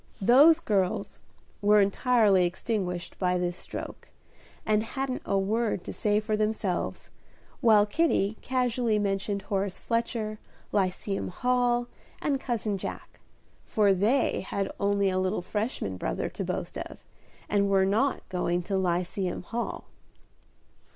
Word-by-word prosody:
"Those 280 Hz, -, +7 dB
girls" 195 Hz, -, -1 dB, 0.4 s
were 210 Hz, +1 st, +5 dB
entirely 205 Hz, -1 st, +4 dB
extinguished 180 Hz, -2 st, -3 dB
by 180 Hz, -1 st, +1 dB
this 175 Hz, -1 st, -1 dB
stroke, -, -, -8 dB, 0.6 s
and 215 Hz, 0 st, +3 dB
hadn't 260 Hz, +3 st, -3 dB
a 195 Hz, -, +1 dB
word 210 Hz, 0 st, 0 dB
to -, -, -6 dB
say 210 Hz, 0 st, +1 dB
for 215 Hz, 0 st, -1 dB
themselves, 210 Hz, -4 st, -2 dB, 0.5 s
while 220 Hz, -5 st, +5 dB
Kitty 215 Hz, -4 st, +1 dB
casually 245 Hz, -3 st, +1 dB
mentioned 200 Hz, 0 st, -1 dB
Horace 195 Hz, -1 st, -2 dB
Fletcher, 230 Hz, -2 st, -2 dB, 0.3 s
Lyceum 195 Hz, 0 st, -1 dB
Hall, 245 Hz, +3 st, +1 dB, 0.3 s
and 275 Hz, -3 st, -1 dB
Cousin 215 Hz, -5 st, -2 dB
Jack, -, -, -7 dB, 0.4 s
for 205 Hz, -2 st, +3 dB
they 215 Hz, +9 st, +2 dB
had 195 Hz, +1 st, -3 dB
only 200 Hz, 0 st, +2 dB
a 185 Hz, -, 0 dB
little 185 Hz, 0 st, -1 dB
Freshman 205 Hz, -, -3 dB
brother -, -, -2 dB
to -, -, -5 dB
boast -, -, -4 dB
of, -, -, -8 dB, 0.4 s
and 200 Hz, -1 st, +2 dB
were 195 Hz, -1 st, +4 dB
not 225 Hz, +8 st, +1 dB
going 180 Hz, -1 st, -1 dB
to 195 Hz, +2 st, -1 dB
Lyceum 180 Hz, +1 st, -1 dB
Hall. 235 Hz, +5 st, -4 dB
205 Hz, 130 wpm, -28 LUFS, 190-230 Hz, 0.6 s, Those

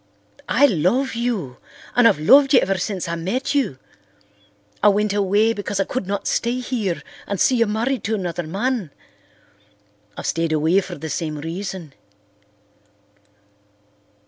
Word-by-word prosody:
I 285 Hz, -, +5 dB
love 240 Hz, -, +1 dB
you—and 230 Hz, -, -1 dB
I've -, -, +3 dB
loved 275 Hz, -, +6 dB
you -, -, +8 dB
ever 195 Hz, -1 st, 0 dB
since 185 Hz, -1 st, -3 dB
I 170 Hz, -, -3 dB
met 190 Hz, -, -2 dB
you. 260 Hz, -, 0 dB, 1.0 s
I 210 Hz, -, +5 dB
went 205 Hz, 0 st, +2 dB
away 205 Hz, +3 st, +2 dB
because 205 Hz, -1 st, -4 dB
I -, -, +3 dB
could 200 Hz, -2 st, -4 dB
not 200 Hz, 0 st, -3 dB
stay 240 Hz, +2 st, 0 dB
here 225 Hz, -8 st, -2 dB, 0.2 s
and 200 Hz, -2 st, -3 dB
see 255 Hz, -, +3 dB
you 230 Hz, -1 st, +3 dB
married 235 Hz, +5 st, -1 dB
to 220 Hz, +2 st, 0 dB
another 180 Hz, -3 st, -3 dB
man. 210 Hz, -, -2 dB, 1.3 s
I've -, -, -6 dB
stayed 165 Hz, -1 st, 0 dB
away 160 Hz, +5 st, +3 dB
for 180 Hz, -2 st, -7 dB
the 160 Hz, -, -7 dB
same 155 Hz, -1 st, -3 dB
reason. 170 Hz, 0 st, -6 dB
200 Hz, 145 wpm, -21 LUFS, 170-235 Hz, 1.3 s, you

